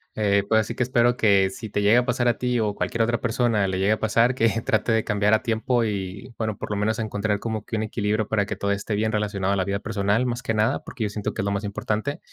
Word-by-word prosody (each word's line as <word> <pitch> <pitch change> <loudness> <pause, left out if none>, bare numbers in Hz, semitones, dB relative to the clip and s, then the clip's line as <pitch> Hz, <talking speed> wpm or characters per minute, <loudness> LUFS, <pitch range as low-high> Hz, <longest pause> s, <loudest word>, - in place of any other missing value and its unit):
eh, 100 -2 +2
pues 110 - +4
ahora 110 - +4
sí - - -5
que - - -4
espero 120 -1 +2
que 100 -5 +3
si 110 +3 -8
te 105 - -1
llega 110 +4 +5
a - - -5
pasar 125 -1 0
a 120 - +2
ti, 125 -1 0
o 105 -2 0
cualquier 115 +2 -1
otra 120 +1 0
persona 115 -4 +1
le 95 0 -2
llegue 100 +2 +2
a 110 - -3
pasar, 115 +3 +2
que 115 -2 +3 0.2
trate 110 +2 +1
de 110 -1 +2
cambiar 105 0 +2
a 110 - -2
tiempo 115 +1 +1
y 100 +3 -5
bueno, 110 -3 -2
por - - -6
lo - - 0
menos 105 +2 0
encontrar 105 -1 -1
como 110 -1 -4
que 115 - -4
un 110 - -1
equilibrio 110 -1 -1
para 105 -2 +1
que - - -3
todo 100 - -1
esté 100 +2 -2
bien 110 +1 0
relacionado 100 -2 0
a - - +1
la 95 - +1
vida 100 +1 -2
personal, 105 +2 0
más 120 0 -2
que 115 -2 -2
nada. 110 +1 +1
Porque, 120 - -6
yo 105 - 0
siento 105 0 -4
que - - -2
es - - -3
lo 100 - 0
más 100 +1 -2
importante. 105 +6 -3
110 Hz, 285 wpm, -24 LUFS, 100-115 Hz, 0.2 s, llega